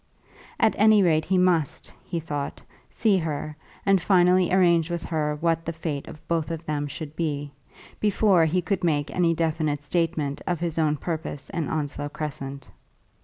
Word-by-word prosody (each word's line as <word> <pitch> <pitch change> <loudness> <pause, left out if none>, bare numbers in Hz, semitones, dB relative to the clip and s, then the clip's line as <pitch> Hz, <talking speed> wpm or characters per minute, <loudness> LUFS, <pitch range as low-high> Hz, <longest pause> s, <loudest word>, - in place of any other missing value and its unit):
At 220 - +4
any 215 -1 +6
rate 155 -3 +3
he 190 - +1
must, 180 -5 +1
he 170 - -3
thought, 145 -3 -4 0.3
see 210 -4 +2
her, 155 -2 -4 0.3
and 195 -2 +4
finally 180 -1 +4
arrange 170 -3 +4
with 170 -1 -3
her 150 -2 -1
what 165 0 +1
the 165 - -3
fate 155 -3 -4
of 155 - -12
both 165 -2 0
of 165 0 -5
them 145 -1 -2
should 150 +1 -7
be, 145 -3 -2 0.5
before 200 -4 +4
he 175 +3 +1
could 185 +2 -1
make 150 -3 0
any 170 -2 +3
definite 155 -3 -1
statement 160 -3 -1
of 175 -3 0
his 165 -1 -2 0.2
purpose 160 -4 -4
in 165 -4 -2
Onslow 145 -1 -3
Crescent. 140 -2 -6
165 Hz, 165 wpm, -25 LUFS, 150-175 Hz, 0.5 s, any